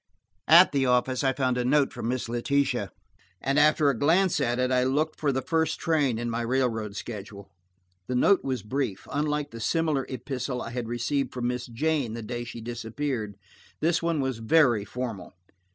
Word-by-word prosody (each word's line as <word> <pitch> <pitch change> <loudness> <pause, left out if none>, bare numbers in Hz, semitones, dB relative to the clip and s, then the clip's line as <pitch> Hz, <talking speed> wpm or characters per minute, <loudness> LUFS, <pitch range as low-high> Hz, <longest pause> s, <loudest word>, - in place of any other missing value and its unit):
At - - +8
the 135 -2 +1
office 125 +1 +1
I 135 - +3
found 130 -1 0
a - - +1
note 140 +2 +2
from - - -5
Miss 125 0 -2
Letitia, 135 +4 0 0.5
and 140 +2 +1
after 150 0 +4
a 120 - -5
glance 175 +5 +3
at 120 +1 0
it 125 0 0
I 125 0 +3
looked 150 +5 0
for 145 -2 +1
the 130 0 -2
first 160 -1 0
train, 145 -8 +1
in 120 +1 -3
my 115 0 -2
railroad 115 -4 -1
schedule. 100 -3 -8 0.6
The 125 - -2
note 195 +10 +4
was 130 -5 -2
brief; 120 -4 -3
unlike 150 0 -1
the 115 - -8
similar 155 +2 0
epistle 125 0 -4
I 115 - -6
had 120 -1 -4
received 125 +3 -1
from 120 -1 -1
Miss 125 0 -3
Jane 135 0 -1
the 115 - -6
day 120 +2 -4
she 120 -1 -8
disappeared, 115 -1 -4 0.4
this 165 +1 +1
one 165 -3 0
was 130 -3 -2
very 120 -4 +3
formal. 115 -6 -6
125 Hz, 185 wpm, -27 LUFS, 120-145 Hz, 0.6 s, At